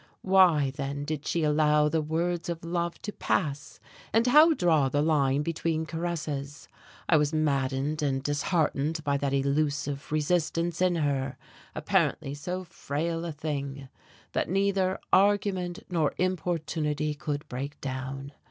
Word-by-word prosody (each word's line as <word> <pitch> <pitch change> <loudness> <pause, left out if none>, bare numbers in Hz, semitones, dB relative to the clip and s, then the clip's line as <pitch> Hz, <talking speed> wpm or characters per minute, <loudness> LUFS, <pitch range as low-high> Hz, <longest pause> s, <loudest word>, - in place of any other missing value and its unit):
Why, 180 -8 +5
then, 140 0 -4
did 150 -1 -4
she 170 - 0
allow 150 0 +3
the 160 +1 +1
words 170 +3 -1
of 170 -1 -4
love 170 0 -2
to 210 - -3
pass? 145 -1 -2 0.3
and 225 +1 +3
how 305 +5 +7
draw 160 - +3
the 145 - 0
line 145 -3 +2
between 165 0 -1
caresses? 155 -3 -4 0.4
I 165 - +5
was 150 0 +1
maddened 140 0 0
and 135 -2 0
disheartened 150 +1 0
by 140 -1 +1
that 140 -1 -1
elusive 140 +1 -1
resistance 165 +2 0
in 180 -1 +3
her 140 -4 -1 0.4
apparently 135 - 0
so 180 +6 -4
frail 165 0 -3
a 170 - -3
thing! 140 -3 -5 0.4
that - - -1
neither 195 0 +1 0.2
argument 190 -3 +2
nor 165 -5 0
importunity 160 -4 -1
could 145 0 -4
break 135 +3 -5
down. 135 +1 -5
155 Hz, 135 wpm, -28 LUFS, 140-170 Hz, 0.4 s, how